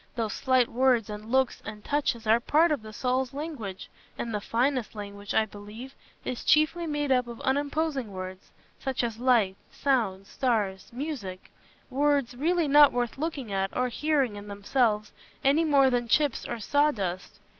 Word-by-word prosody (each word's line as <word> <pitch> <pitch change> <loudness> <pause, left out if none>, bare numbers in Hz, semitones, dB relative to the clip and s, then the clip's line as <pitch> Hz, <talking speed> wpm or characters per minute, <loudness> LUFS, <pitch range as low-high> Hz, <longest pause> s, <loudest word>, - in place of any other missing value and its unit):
Those 225 -3 -2
slight 255 -3 +2
words 240 -3 +2
and 210 +2 -8
looks 265 -2 +2
and 210 0 -8
touches 275 -6 0
are 220 +2 +5
part 310 +7 +3
of 295 - 0
the 215 0 -10
soul's 255 +3 -1
language; 280 - -6 0.3
and 230 - -4
the 210 - -1
finest 250 +1 0
language, 200 0 -6
I 220 - +4
believe, 215 +5 -10 0.3
is 250 - -4
chiefly 320 +3 +3
made 295 -2 -1
up 250 -2 +3
of 235 -1 -8
unimposing 285 -2 -1
words, 185 0 -7 0.3
such 265 -2 -2
as 230 -2 -3
"light," 235 -7 +3
"sound," 220 -9 0
"stars," 205 -6 -1
"music"—words 270 +2 -3
really 330 +4 +1
not 290 0 +7
worth 245 +1 -2
looking 280 -9 -3
at, 195 0 -1
or 250 0 +1
hearing, 275 -5 0
in 205 0 -9
themselves, 210 +1 0 0.3
any 285 +4 +4
more 275 -3 +4
than 240 -1 0
"chips" 290 +3 +1
or 240 - -3
"sawdust." 210 -9 0
245 Hz, 160 wpm, -27 LUFS, 210-280 Hz, 0.3 s, not